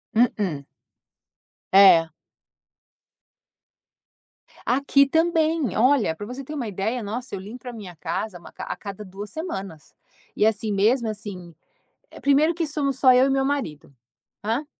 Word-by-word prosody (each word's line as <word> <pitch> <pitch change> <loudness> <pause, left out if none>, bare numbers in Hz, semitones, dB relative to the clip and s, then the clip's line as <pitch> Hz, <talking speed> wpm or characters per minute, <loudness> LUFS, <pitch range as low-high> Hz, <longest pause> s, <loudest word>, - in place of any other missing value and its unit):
mm-mm. 200 - +1 1.1
É. 190 -4 +7 2.6
Aqui 275 +2 +3
também. 320 - +1
Olha, 240 - +3
para 205 - -7
você 250 +5 -7
ter 300 - -8
uma 265 -6 -3
ideia 215 +5 -2
nossa, 225 +2 -5
eu - - -5
limpo 210 +6 -9
para 245 -1 -8
minha 195 -6 -9
casa 180 +5 -4
uma 170 - -14
a - - -5
cada 200 0 -8
2 200 +2 -8
semanas, 195 - -7 0.4
e 210 - +2
assim 220 0 +1
mesmo 225 +5 +2
assim. 200 -5 -7 0.6
Eh, - - -13
primeiro 290 +4 +3
que 330 0 -1
somos 285 -3 -2
só 260 -2 +6
eu 255 +1 +5
e - - +1
meu 270 0 +1
marido 210 - -3 0.5
hã? 230 +8 -1
225 Hz, 140 wpm, -24 LUFS, 195-275 Hz, 2.6 s, É